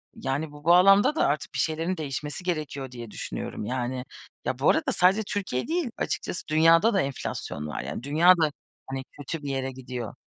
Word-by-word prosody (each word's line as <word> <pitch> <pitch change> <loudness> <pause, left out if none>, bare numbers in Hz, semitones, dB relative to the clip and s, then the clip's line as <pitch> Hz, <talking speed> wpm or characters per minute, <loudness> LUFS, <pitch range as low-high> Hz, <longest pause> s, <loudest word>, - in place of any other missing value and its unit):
Yani, 145 +3 -2
bu 145 0 -13
bağlamda 195 - +6
da - - +3
artık 145 +1 -2
bir 130 - -3
şeylerin 165 +6 0
değişmesi 150 +2 -4
gerekiyor, 150 -6 -3
diye 120 -3 -8
düşünüyorum. - - -5
Yani, 125 +2 -3 0.4
ya, 130 - -2
bu 140 - +4
arada - - +2
sadece 185 +4 +4
Türkiye 185 -11 -2
değil 325 -6 -1
açıkçası, 180 - -3
dünyada 165 +7 +5
da 195 - +3
enflasyon 125 - -4
var. 75 - -4
Yani, - - -6
dünya 160 +6 +6
da, 155 -2 +2 0.4
hani, 135 0 -4
kötü 145 +2 -6
bir 140 - -4
yere 135 -1 -2
gidiyor. 125 -3 -6
150 Hz, 180 wpm, -26 LUFS, 130-175 Hz, 0.4 s, bağlamda